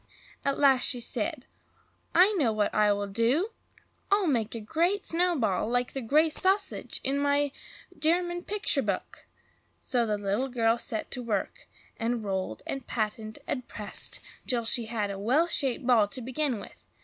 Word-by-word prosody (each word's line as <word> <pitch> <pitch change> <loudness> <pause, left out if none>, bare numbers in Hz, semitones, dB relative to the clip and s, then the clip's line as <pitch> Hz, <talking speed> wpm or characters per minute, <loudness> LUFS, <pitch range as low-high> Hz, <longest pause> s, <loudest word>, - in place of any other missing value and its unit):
At 275 0 0
last 270 -3 +4
she 250 - +2
said, 235 - -1 0.7
"I 365 +5 +7
know 285 - +2
what 215 -1 0
I 210 -1 +4
will 205 0 0
do! 230 - +1 0.6
I'll 400 -1 +4
make 235 -8 0
a - - -3
Great 340 - 0
Snowball, 325 - +1
like 245 0 0
the 270 - -3
Great 300 +7 +3
Sausage 385 +3 +1
in 275 +1 0
my 285 0 +2 0.5
German 345 +2 +1
picture 400 -9 +1
book." 200 -6 -4 0.5
So 240 -3 0
the 210 -1 0
little 205 +6 -1
girl 230 -2 +2
set 220 -2 -4
to 250 - -3
work, 245 - -3 0.3
and 230 0 -1
rolled 190 - -3
and 270 -3 -5
patted 215 -1 -3
and 250 -2 -3
pressed 210 -2 -4 0.3
till 235 -2 +1
she 230 +1 +4
had 215 -3 -2
a 195 - -6
well 255 +11 +3
shaped 270 -6 0
ball 235 -5 +5
to 255 +5 -2
begin 260 0 -1
with. - - -13
245 Hz, 165 wpm, -28 LUFS, 220-305 Hz, 0.7 s, I